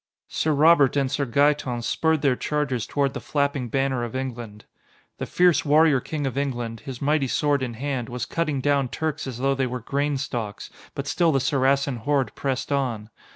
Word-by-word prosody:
Sir 155 - 0
Robert 145 -2 +5
and 135 -2 +1
Sir 140 0 -1
Gaeton 135 -2 +1
spurred 160 +4 +1
their 135 -3 +3
chargers 140 -4 -2
toward 140 -2 0
the - - -4
flapping 140 -4 -1
banner 135 0 0
of 120 +1 -5
England. 120 -5 -6 0.5
The - - -3
fierce 180 -2 +3
warrior 150 -1 +4
king 150 +3 -4
of 135 0 -2
England, 120 -5 -3
his 130 +3 -7
mighty 145 -1 +2
sword 145 +1 +1
in 120 -3 -3
hand, 130 -1 -3
was 125 0 -4
cutting 150 -5 -1
down 140 -1 +2
Turks 155 +2 -3
as 125 -3 -5
though 135 +2 +1
they 135 -1 0
were 125 0 -4
grain 140 +4 -1
stalks, 115 -6 -5 0.2
but 140 - -4
still 170 +3 +2
the 135 - +2
Saracen 135 0 +1
horde 135 +2 0
pressed 135 0 -3
on. 120 -6 -1
135 Hz, 190 wpm, -24 LUFS, 125-145 Hz, 0.5 s, Robert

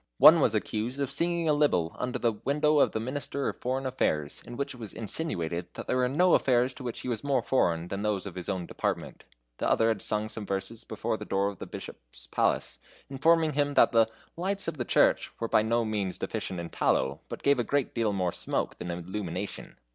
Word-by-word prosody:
One 160 - +9
was 115 - +3
accused 110 +5 -2
of 140 -1 -1
singing 170 +2 0
a 155 - +4
libel 115 - +2
under 125 0 -2
the 120 -2 +2
window 150 +7 +1
of - - +4
the - - -2
Minister 140 +3 -3
of - - -6
Foreign 130 +2 -2
Affairs, 75 - -1
in 120 - -7
which 140 +1 -2
it 125 - -13
was 110 -3 -6
insinuated 90 - -3
that - - -6
there 125 - 0
were 125 0 +2
no 175 +7 +4
affairs 125 0 +3
to 130 - -10
which 120 -2 -4
he - - -6
was 115 -3 -2
more 140 -1 +1
foreign 85 -9 +1
than 100 - -3
those 105 -2 -1
of 100 - -6
his 90 +1 -4
own 95 -3 -2
department. - - -3 0.3
The - - +1
other 115 - +3
had 110 -4 0
sung 105 0 -1
some 110 0 -4
verses 100 +3 -4
before - - -3
the - - -7
door 100 +1 +1
of 100 - -10
the - - -6
Bishop's - - -8
palace, - - 0 0.3
informing 160 +3 +3
him 145 0 0
that - - +6
the 115 -1 +5 0.3
"lights 195 +3 -2
of 165 -2 -3
the 120 - -2
church" - - +3
were 115 - -1
by 110 - +4
no 115 +1 +1
means 105 -4 -2
deficient 110 -5 -4
in 85 -1 -6
tallow, 70 +3 +1
but - - -7
gave 140 -2 +4
a - - +2
great 140 +3 0
deal 115 -3 +1
more 90 -3 0
smoke - - -2
than 90 - -5
illumination. 90 +2 -5
115 Hz, 225 wpm, -29 LUFS, 100-140 Hz, 0.3 s, One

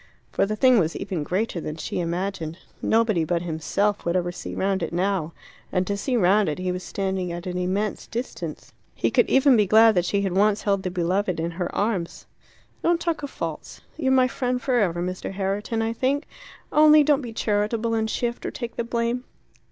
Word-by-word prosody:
For - - +1
the 215 - -2
thing 255 0 +5
was 165 -2 0
even 180 -5 -3
greater 185 +3 -2
than 155 - -5
she 160 - -4
imagined. 170 -1 -3 0.2
Nobody 220 -6 +2
but 170 +2 -1
himself 185 +5 -1
would 170 +1 -1
ever 175 -1 0
see - - -7
round 195 0 0
it 165 - -2
now. 180 -2 0 0.4
And 180 0 +1
to 200 - -1
see 245 +5 -1
round 200 -1 +4
it 150 - -3
he 185 0 -2
was 180 0 -4
standing 190 -1 -2
at 175 +2 -6
an 180 -1 -4
immense 195 +3 -2
distance. 240 +3 -6 0.2
He - - 0
could - - +3
even 265 0 +5
be 210 -3 +3
glad 220 +2 +7
that 180 -3 +1
she 200 +2 0
had 190 -2 -1
once 205 +1 +3
held 200 -2 +1
the 185 - -2
beloved 180 +1 0
in 165 +1 -2
her 175 +1 -3
arms. 200 -5 -2 0.6
"Don't 340 0 +2
talk 335 -3 -1
of 285 - -5
'faults.' - - -6
You're 265 -4 0
my 260 -1 +5
friend 250 -1 -1
for 250 0 +1
ever, 175 -4 0
Mr. 185 +1 -4
Herriton, 205 +4 -1
I 225 0 -1
think. 275 +5 0 0.5
Only 305 0 +7
don't 290 -1 +3
be 240 -3 -6
charitable 220 +1 0
and 220 -1 0
shift 235 +1 -2
or - - -2
take 235 -2 -6
the - - 0
blame. 235 +1 -1
200 Hz, 205 wpm, -24 LUFS, 180-235 Hz, 0.6 s, glad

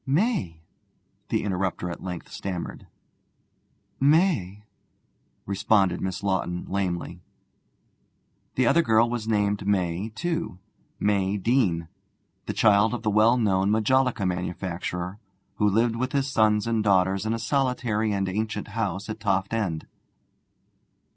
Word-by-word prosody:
'May!' 140 - 0 0.7
the - - 0
interrupter 95 -2 -2
at - - -8
length 90 -3 -6
stammered. 90 -3 -5 1.1
'May!' 140 - +2 0.8
responded 100 -2 +2
Miss 95 +1 -3
Lawton 90 -3 -1
lamely. 90 -2 -3 1.3
The 130 - +2
other 170 - +5
girl 115 -5 +4
was 120 -2 -3
named 105 -2 0
May 95 0 0
too 165 - -2 0.4
May 100 -1 +1
Deane, 95 -7 +1 0.6
child 110 +2 +4
of 115 - -7
the 105 - +1
well 110 +4 +4
known 100 -4 +2
majolica 115 +1 +2
manufacturer, 90 +1 -3 0.4
who 105 - +3
lived 115 +3 +2
with 130 +2 -2
his 140 -1 +1
sons 110 -5 +2
and 115 -2 0
daughter 95 -2 +3
in 110 +1 0
a - - -4
solitary 120 -4 0
and 100 -1 0
ancient 105 +2 -3
house 100 -3 -3
at 110 0 -5
Toft 100 0 0
End. 95 -9 -1
105 Hz, 120 wpm, -25 LUFS, 95-115 Hz, 1.3 s, other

